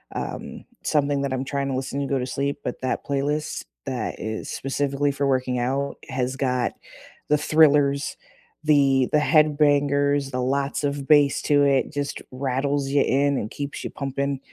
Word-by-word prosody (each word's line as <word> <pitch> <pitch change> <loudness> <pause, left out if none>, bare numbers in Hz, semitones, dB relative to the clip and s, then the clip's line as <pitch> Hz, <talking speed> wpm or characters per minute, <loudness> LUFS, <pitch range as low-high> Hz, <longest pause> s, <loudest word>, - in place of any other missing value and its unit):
um, - - -6 0.2
something 145 -2 +1
that 140 -1 -1
I'm 130 0 -1
trying 140 0 -2
to 135 - -2
listen 135 +2 -3
to 140 - -2
go 135 - 0
to 125 - -2
sleep, 140 +2 -2
but - - -4
that 130 - -2
playlist, 145 +2 -2 0.2
that 130 -5 -3
is 110 0 -4
specifically 140 +1 -1
for 140 0 -1
working 130 -1 0
out, 135 +3 -1
has 130 -1 -2
got 125 -2 0 0.6
the 150 - +4
thrillers, 145 -2 +3 0.5
the 140 -4 +3
the 150 - +4
head 150 -1 +3
bangers, 145 -1 +2
the 125 -1 -2
lots 140 +3 -1
of 140 -1 -3
bass 145 -2 +5
to 145 -1 +4
it, 140 0 +2
just 145 -1 -3
rattles 135 +2 -1
you 140 0 +3
in 140 +1 +2
and 105 - -4
keeps 140 0 -5
you - - -4
pumping, 140 0 -3
140 Hz, 175 wpm, -24 LUFS, 135-145 Hz, 0.6 s, bass